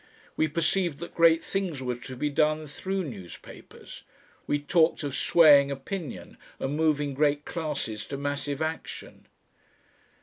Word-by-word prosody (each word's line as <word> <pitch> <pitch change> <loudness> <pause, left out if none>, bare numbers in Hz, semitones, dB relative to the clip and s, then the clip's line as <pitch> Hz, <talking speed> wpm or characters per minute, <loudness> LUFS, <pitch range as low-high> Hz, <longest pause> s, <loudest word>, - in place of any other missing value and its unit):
We 160 - +2
perceived 170 +1 0
that 170 +2 -8
great 165 -1 +5
things 190 -7 -2
were 125 -1 -2
to 130 +1 -9
be 145 +4 -2
done 155 +2 +1
through 190 +6 -3
newspapers. 100 - -11 0.5
We 145 - +2
talked 160 +2 +2
of 140 -2 -3
swaying 145 0 +6
opinion 140 +3 -6 0.2
and 135 +2 -3
moving 150 -2 +1
great 145 +1 +1
classes 145 -10 -4
to 140 - -5
massive 145 +1 -2
action. 160 +1 -6
150 Hz, 135 wpm, -27 LUFS, 140-165 Hz, 0.5 s, swaying